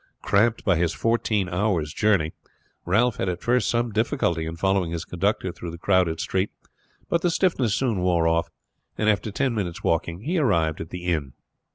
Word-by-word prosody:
Cramped 110 +3 +2
by 95 -4 +3
his 85 0 +1
fourteen 110 -4 0
hours' 90 -4 0
journey 95 -7 +2 0.5
Ralph 110 +6 +2
had 95 - -1
at 90 -1 -4
first 120 -2 +2
some 120 0 0
difficulty 105 - 0
in 80 - -5
following 95 0 +1
his 85 -1 -4
conductor 95 +1 -1
through 85 - -7
the 85 - -7
crowded 90 -2 +2
street, 95 +2 -1 0.6
but 170 - +1
the 175 - +2
stiffness 150 - +1
soon 115 -3 0
wore 85 -2 +2
off, 85 0 +1 0.5
and 110 - 0
after 105 +1 +1
ten 130 +4 0
minutes 95 -6 -3
walking 85 +2 0
he 170 +8 -1
arrived 85 - +1
at 80 - -6
the 90 0 -7
inn. 75 -7 -1
95 Hz, 185 wpm, -24 LUFS, 85-110 Hz, 0.6 s, by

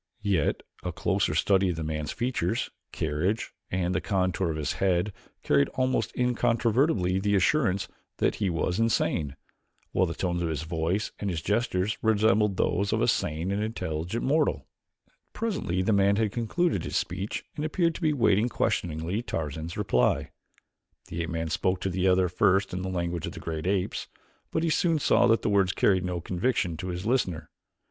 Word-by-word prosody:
Yet 95 -7 +1 0.2
a - - -3
closer - - 0
study 95 -1 +3
of 90 - -1
the 80 - -4
man's 75 -1 -3
features, 120 -3 -1 0.2
carriage, 80 +8 -1 0.2
and 90 -1 0
the 95 - 0
contour 95 -2 0
of 80 - -2
his 75 -3 -1
head 95 +1 +2 0.3
carried 70 -1 +3
almost 130 -4 +1
incontrovertibly 115 - +2
the 100 +1 +1
assurance 100 -2 +2 0.3
that - - +2
he 100 -3 0
was 90 +3 -1
insane, 85 -10 +1 0.6
while 95 - +2
the 85 - -4
tones 85 -1 -1
of 85 - 0
his 80 -1 -2
voice 85 +6 -1
and 100 - -2
his 85 -3 -3
gestures 105 -2 0
resembled 105 -2 +3
those 100 +3 +1
of - - +1
a - - +2
sane 80 +5 0
and 100 +1 0
intelligent 90 -2 -3
mortal. 150 +3 +1 0.7
Presently 140 - -1
the 110 - +2
man 100 0 +4
had 110 -1 +1
concluded 120 - 0
his - - -2
speech 100 +2 -3
and 150 - -3
appeared 165 +2 +1
to - - -9
be 155 -2 +3
waiting 120 -4 +3
questioningly 85 0 -1
Tarzan's 80 - -4
reply. 65 -12 +1 0.8
The 85 - -3
ape 85 - -3
man 80 -1 -3
spoke 90 +2 0
to 95 - -1
the 95 +1 +1
other 90 0 +4
first 95 +2 +2
in 90 - -2
the 95 - -3
language 85 -2 -2
of - - -6
the - - -8
great 80 0 -4
apes, 95 -1 -1 0.4
but 160 - -1
he 165 - +2
soon 165 0 +2
saw 120 -4 +4
that 115 0 +3
the - - +1
words 100 -2 +3
carried 95 -3 +3
no 90 -1 -2
conviction 90 0 -1
to 90 - -5
his 90 +1 -4
listener. 90 - 0
95 Hz, 180 wpm, -27 LUFS, 85-110 Hz, 0.8 s, man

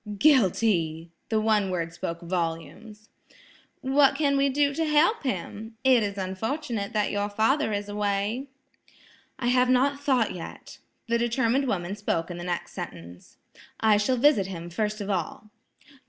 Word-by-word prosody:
"Guilty!" 185 - +2 0.2
the 220 - +2
one 215 -2 +2
word 170 -2 -3
spoke 170 0 -5
volumes. 180 +5 -4 0.7
"What 270 +1 +4
can 285 -2 +1
we 275 0 +3
do 285 +1 +2
to 325 - -1
help 315 +9 +3
him? 220 - -5
It 260 -3 +5
is 200 -1 -3
unfortunate 215 +4 -3
that 210 -1 +1
your 205 0 -1
father 220 +6 +1
is 205 0 -2
away." 205 +5 -1 0.9
"I 245 -2 -1
have 250 0 +3
not 275 +2 +3
thought 260 -6 +1
yet." 175 -2 -9 0.3
The 235 0 +1
determined 240 +3 +1
woman 190 -3 -2
spoke 180 -5 -2
in 175 - -6
the - - -6
next 175 -1 -3
sentence, 85 +1 -9 0.4
"I 220 -2 +4
shall 230 +5 +1
visit 245 -7 +4
him 175 -2 -7
first 215 +3 -2
of 205 0 -3
all." 190 +3 -4
215 Hz, 155 wpm, -26 LUFS, 190-260 Hz, 0.9 s, It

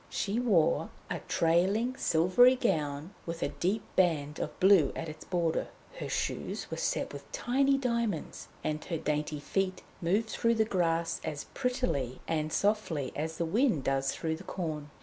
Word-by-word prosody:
She 210 +3 -1
wore 200 -10 +3 0.2
a - - -1
trailing 190 +9 +2
silvery 185 +5 +5
gown, 160 - -1
with 165 0 -3
a - - 0
deep 200 +4 -1
band 155 -5 +2
of - - -4
blue 185 -7 +6
at - - -4
its 155 0 -9
border. 170 -3 0 0.3
Her - - -4
shoes - - -3
were - - -3
set - - -1
with - - -10
tiny 275 - +2
diamonds, 235 - -2 0.2
and 155 0 -2
her 165 - -2
dainty 150 0 -1
feet 185 +4 -1 0.2
moved 200 +6 +1
through 230 0 +2
the 220 -1 +3
grass 170 -4 0
as 145 -2 -4
prettily 250 - -1
and 155 -1 0
as - - 0
softly 195 -10 0
as 160 +2 -3
the 170 - 0
wind 205 - +2
does 135 0 +1
through 160 -1 -2
the 185 - -11
corn. 155 -6 -4
170 Hz, 170 wpm, -30 LUFS, 155-220 Hz, 0.3 s, blue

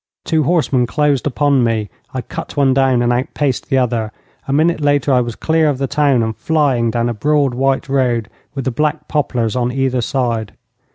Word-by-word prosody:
Two 160 -2 +1
horsemen 140 -6 +1
closed 145 0 +1
upon 140 -1 +2
me. 110 -3 -1 0.2
I 130 - -3
cut 120 - -8
one 135 -2 +3
down 130 -2 +2
and 120 0 +2
outpaced 130 +1 -2
the 135 - +2
other. 115 -4 0 0.4
A - - -2
minute 155 +3 +2
later 145 -2 +2
I 125 - +4
was 120 -2 -4
clear 160 -1 +1
of 140 - -1
the 135 - -1
town, 140 -4 +2
and 110 0 -3
flying 140 -7 +1
down 115 +1 0
a 120 - -1
broad 140 +3 +1
white 135 +2 0
road 125 -5 0 0.3
with 135 - -4
the 130 - 0
black 150 +4 -1
poplars 125 -6 -1
on 125 -1 0
either 130 -1 0
side. 115 -5 -2
130 Hz, 195 wpm, -17 LUFS, 120-145 Hz, 0.4 s, I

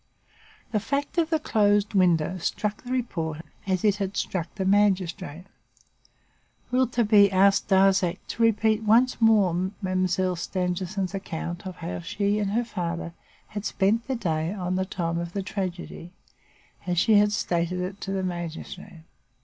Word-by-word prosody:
The 215 - +1
fact 280 - -2
of 325 -1 +1
the 320 - +2
closed 205 -6 +2
window 180 -2 +2
struck 210 +5 -2
the 250 - -8
reporter 165 -11 -2 0.2
as 190 +1 0
it 205 -1 +3
had 195 -1 -3
struck 175 -2 -3
the 190 - -2
magistrate. 185 -4 +1 1.3
Rouletabille 235 -5 +4
asked 195 +1 +4
Darzac 190 -2 +3
to - - -4
repeat 220 -1 +3
once 230 +4 +3
more 215 -6 +5 0.3
Mademoiselle 185 -1 0
Stangerson's 185 +2 -2
account 175 -2 -5
of 185 - -6
how 90 0 -5
she 200 - -1
and 205 -2 0
her 235 +2 +1
father 170 -5 -4 0.4
had 205 -1 -5
spent 220 +3 +1
their 265 -2 -1
time 165 0 -2
on 180 0 -1
the 190 0 0
day 195 - -12 0.2
of 170 0 -6
the 200 - -2
tragedy, 180 -2 -5 0.7
as 175 -1 0
she 205 +4 +5
had 210 0 +3
stated 180 -3 -1
it 185 +2 -5
to 195 - -4
the 190 -1 -1
magistrate. 175 -2 -6
190 Hz, 150 wpm, -26 LUFS, 180-210 Hz, 1.3 s, more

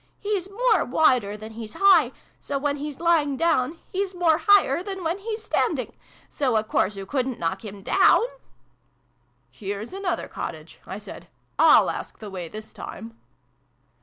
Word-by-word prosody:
" - - -41
He's 405 -3 -2
more 445 0 +2
wider 245 -7 +2
than 215 +1 -9
he's 220 -1 -8
high: 360 -10 +5 0.3
so, 280 - -3
when 285 +1 -1
he's 290 -1 -6
lying 320 -5 +2
down, 325 -2 +1
he's 385 -1 -2
more 335 -3 +3
higher 390 -7 +5
than 385 -1 -6
when 335 +4 -1
he's 435 +1 -5
standing: - - -1 0.3
so 260 -5 -1
a 215 - +1
course 210 -1 0
oo 195 - -6
couldn't 260 +2 -2
knock 180 +4 -2
him 200 -2 -9
down! - - +5 0.5
" - - -42 0.2
" - - -42 0.3
Here's 205 - -6
another 390 -2 -2
cottage," - - -7
I - - -5
said: - - -10 0.3
"/Y/ask - - +4
the 210 -2 -9
way, 180 -3 -5
this 215 +3 -9
time." 225 0 -9
285 Hz, 165 wpm, -24 LUFS, -, 0.5 s, high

